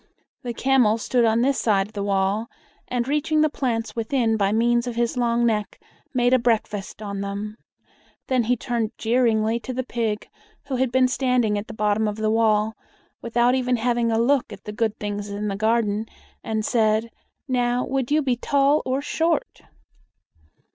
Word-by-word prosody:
The 240 -3 -5
camel 250 -5 +3
stood 240 +1 +1
on 225 +1 +3
this 270 +1 +2
side 200 -3 +1
the 210 -2 -5
wall, 200 +3 0 0.4
and, 245 -1 -2
reaching 305 +2 +1
the 310 -1 +2
plants 225 -6 -2
within 230 0 +1
by 200 -2 +1
means 235 +2 +2
of 240 - -4
his 235 +1 0
long 240 -1 +1
neck, 215 -3 -1 0.3
made 245 -1 +2
a 255 - +5
breakfast 215 -3 -1
on 200 -1 -4
them. 205 +2 -5 0.7
Then 255 -3 +1
he 245 +2 +1
turned 230 -2 -2
jeeringly 230 -1 +1
to 255 - -6
the 255 +1 -2
pig, 225 -4 -2 0.4
who 270 -2 -2
had 260 -1 +1
been 260 0 +4
standing 250 -4 +1
at 205 +1 -4
the 225 - -9
bottom 210 0 +1
of 210 - -2
the 215 0 0
wall, 220 -1 +2 0.5
without 240 +1 +2
even 250 -1 +1
having 235 0 +1
a 225 - +1
look 245 +1 +2
at 195 -2 -10
the 210 - -7
good 220 -1 -1
things 205 0 -4
in 205 +1 -3
the 195 - -2
garden, 220 0 0 0.4
and 220 -1 -2
said, 220 -1 +1 0.4
"Now, 245 -1 +1
would 265 -2 -2
you 300 +1 +2
be 255 -2 +1
tall 280 +4 +2
or 265 +2 -1
short?" 325 +1 -1
230 Hz, 180 wpm, -23 LUFS, 215-250 Hz, 0.7 s, a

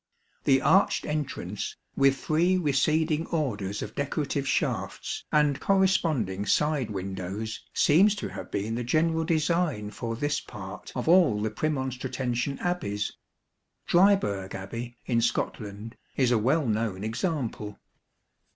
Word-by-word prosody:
The 135 -1 +4
arched 195 - +4
entrance, 140 -10 -3 0.2
with 135 0 +4
three 170 +7 +2
receding 155 +1 +1
orders 105 - -2
of 110 - -7
decorative 140 0 -2
shafts 115 - -2
and 150 -2 +3
corresponding 160 - +1
side 150 -6 +2
windows, 95 +2 -4 0.2
seems 195 +8 +5
to 210 - -4
have - - -8
been 105 +3 -2
the 120 +1 -2
general 160 +6 +2
design 160 - 0
for 115 +1 -4
this 145 +4 0
part 100 -2 -9
of 125 - -3
all 165 - +5
the 110 0 -1
Prernon 130 +1 -1
stratensian 125 +1 -2
Abbeys. 105 - -1 0.8
Dryburgh 170 - +3
Abbey, 115 +5 -6
in 115 -2 +1
Scotland, 110 -1 -2 0.2
is 130 -3 +3
a 120 - +4
well 135 +7 +2
known 110 -4 -1
example. 115 - -3
130 Hz, 125 wpm, -27 LUFS, 105-155 Hz, 0.8 s, seems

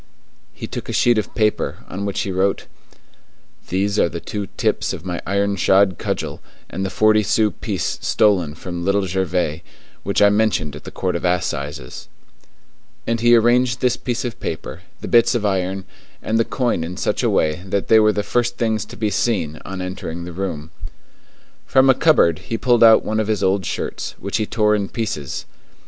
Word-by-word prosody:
He - - -8
took - - -7
a - - -3
sheet 120 -2 +3
of - - -6
paper, 105 -2 0
on 100 +2 -4
which 100 - -2
he 100 - -3
wrote: 95 +2 0 1.0
"These 100 +3 0
are - - +3
the 85 - -5
two 100 +3 -5
tips - - 0
of - - -8
my 90 -2 -3
iron 100 +1 0
shod 95 0 +3
cudgel - - -3 0.3
and 95 - -3
the 95 - -1
forty 110 +2 +3
sou 105 0 +2
piece - - -3
stolen 90 -8 +2
from 85 +1 -6
Little 100 +1 +1
Gervais, 90 -3 -1 0.4
which - - -1
I 105 - +6
mentioned 100 -8 +1
at 75 - -11
the - - -6
Court 90 -1 -2
of 85 - -3
Assizes," 70 -8 -3 1.0
and 115 0 0
he 120 +1 +5
arranged 120 +1 +3
this 125 -1 +2
piece 125 -1 -3
of 120 -1 -5
paper, 80 - -5 0.2
the - - -5
bits 120 +1 +4
of 110 -3 -1
iron, 95 -1 -1 0.3
and 110 +1 -1
the 115 - +2
coin 120 -10 -1
in 90 +2 -6
such - - -1
a - - +2
way 80 +3 +1
that 100 +1 -1
they 110 - +6
were 110 0 +5
the 105 0 -2
first 120 +2 -1
things 110 -3 0
to - - -12
be 105 -1 -1
seen 95 -8 -1
on 95 -1 -5
entering 90 -2 -5
the 90 0 -7
room. 80 -4 -4 1.0
From 135 0 +5
a - - +4
cupboard 110 - +3
he 115 - -4
pulled 120 -1 +3
out 110 -1 +7
one 110 0 -1
of 110 - -1
his 105 -3 0
old 95 -1 +1
shirts, - - -4
which 100 - -3
he 110 -2 -1
tore 105 -1 +2
in 100 -2 -1
pieces. 90 - -4
100 Hz, 195 wpm, -20 LUFS, 90-110 Hz, 1.0 s, out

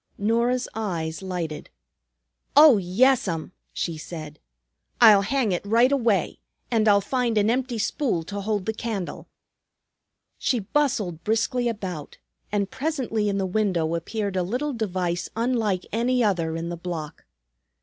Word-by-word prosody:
Norah's 235 +4 +1
eyes 170 -7 -3
lighted. 175 -5 -4 0.9
"Oh, 295 -6 +9
yes'm," 190 -3 +1 0.2
she 165 -3 -3
said. 155 -2 -8 0.6
"I'll 215 -4 +8
hang 235 +1 0
it 175 - -1
right 230 +5 +3
away. 230 - +1 0.3
And 220 -2 +2
I'll 200 -1 +5
find 245 0 0
an 210 +2 +3
empty 250 -1 -1
spool 215 - -1
to 200 +4 -5
hold 205 -2 -1
the 220 - -1
candle." 215 -5 -5 1.1
She 250 - +1
bustled 205 - -1
briskly 240 +3 +1
about, 185 -9 -6 0.3
and 200 -1 -1
presently 260 -8 -1
in 200 - -1
the 195 - 0
window 185 -5 0
appeared 200 +4 -3
a 185 - +1
little 250 +11 -2
device 185 -6 -2
unlike 225 -5 0
any 245 +3 +1
other 170 -6 0
in 165 +1 -4
the 175 - -4
block. 165 -3 -6
205 Hz, 140 wpm, -24 LUFS, 180-235 Hz, 1.1 s, Oh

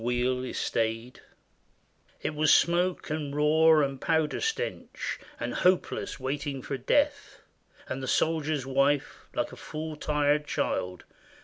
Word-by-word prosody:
THE - - -3
RELIEF 125 +1 0
OF - - -3
LUCKNOW 115 +2 0 1.1
It 155 - -1
was 155 0 +3
smoke 175 -1 +3
and 150 -2 -3
roar 155 +1 +5
and 135 -1 -3
powder 160 -2 +1
stench, 450 +2 -3 0.2
And - - -3
hopeless 180 0 +1
waiting 135 0 -3
for 140 - -3
death; 285 - 0 0.5
And 135 - -4
the 130 - -4
soldier's 155 -3 +1
wife, 140 +1 0
like - - -1
a - - -9
full 155 0 -6
tired 150 0 +1
child. 90 -9 -2
150 Hz, 135 wpm, -28 LUFS, 130-160 Hz, 1.1 s, roar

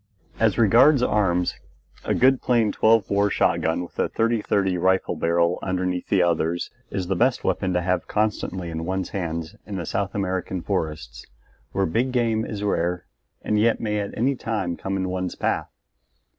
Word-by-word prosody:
As - - +2
regards 125 +5 +5
arms, 90 -6 +1 0.5
a - - 0
good 130 0 +4
plain 115 -4 +2
12 110 -2 +3
bore 100 +1 +2
shotgun 85 -2 +1
with 85 - -11
a - - +1
30 115 0 +1
30 95 -3 0
rifle 95 +1 +1
barrel 85 +1 +1
underneath 90 -1 -2
the 95 -3 +4
others 85 0 0 0.2
is 95 -2 -3
the 95 +2 -1
best 125 +6 +1
weapon 95 -2 0
to 90 - +1
have 90 -1 -1
constantly 95 -4 -1
in 80 0 -4
one's 95 0 -2
hand 85 -4 -4
in 100 - -5
the 90 -3 -3
South 95 +3 -2
American 95 -2 -2
forests, 80 -10 -3 0.5
where 95 - +1
big 120 +10 0
game 115 -3 +1
is 105 -2 -5
rare 90 -3 -1 0.4
and 105 0 +1
yet 115 +2 +3
may 105 -2 -1
at 100 -1 -5
any 135 +5 +1
time 105 -8 -2
come 95 +2 -3
in 95 -1 -1
one's 90 0 -3
path. - - -1
95 Hz, 175 wpm, -24 LUFS, 90-110 Hz, 0.5 s, regards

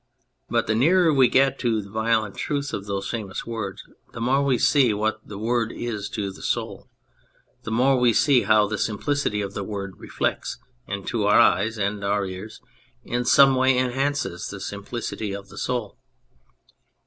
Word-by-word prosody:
But - - +1
the 110 - 0
nearer 165 +8 +4
we 135 -3 +5
get 135 +2 +2
to 115 -3 +1
the 100 - -7
violent 110 -1 0
truth 145 -2 -3
of 100 0 -4
those 100 -1 -3
famous 105 -5 -5
words 110 -5 -5 0.3
the - - -7
more 130 +4 +2
we 135 -3 +2
see 125 -4 +3
what 110 +1 -1
the 105 - -9
Word 115 +1 0
is 110 -4 -4
to 100 -3 -2
the 95 - -13
Soul, - - -3 0.7
the - - -7
more 130 +3 +3
we 125 -1 +4
see 135 +1 +4
how 110 -1 +4
the 105 0 -3
simplicity 110 0 -1
of 100 -1 -5
the 100 - -4
Word 100 -3 -6
reflects - - -3 0.3
and, 100 -1 -5
to 110 -3 -1
our 105 - +5
eyes 105 +5 +3
(and 100 0 -2
our 100 0 0
ears), 95 +3 -8 0.4
in 120 +1 -2
some 135 +2 +6
way 130 0 +3
enhances 130 -6 -1
the 100 - -7
simplicity 100 +1 -5
of 100 0 -8
the - - -13
Soul. 120 -5 -3
110 Hz, 180 wpm, -24 LUFS, 100-125 Hz, 0.7 s, some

